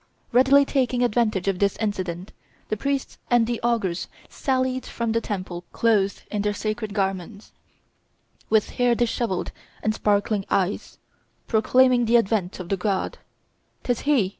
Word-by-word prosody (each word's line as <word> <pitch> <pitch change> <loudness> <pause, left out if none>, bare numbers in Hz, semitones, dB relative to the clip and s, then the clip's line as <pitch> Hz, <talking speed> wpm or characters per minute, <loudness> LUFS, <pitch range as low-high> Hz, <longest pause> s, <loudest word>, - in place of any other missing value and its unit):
Readily 270 +3 +6
taking 250 -3 +1
advantage 215 -5 +1
of 195 -2 0
this 200 -1 +1
incident, 185 -4 -3 0.4
the - - 0
priests 275 +4 -2
and 240 -2 +4
the 235 0 -3
augurs 215 -7 0 0.2
sallied 260 -1 -1
from 235 -1 -3
the 230 +1 +1
temple 185 -5 -5
clothed 205 -4 +1
in 210 - -1
their 205 0 0
sacred 215 -1 -3
garments, 195 +1 -3 1.0
with 220 -1 +2
hair 245 -1 +2
dishevelled 235 -4 -1 0.3
and 215 - +1
sparkling 205 -1 +1
eyes, 195 +1 -1 0.5
proclaiming 250 +2 +4
the 235 +1 +5
advent 200 -5 0
of 180 -1 -7
the 195 - 0
god: 190 0 -2 0.6
"'Tis 245 -2 0
he! 270 -10 +2
220 Hz, 140 wpm, -24 LUFS, 195-240 Hz, 1.0 s, Readily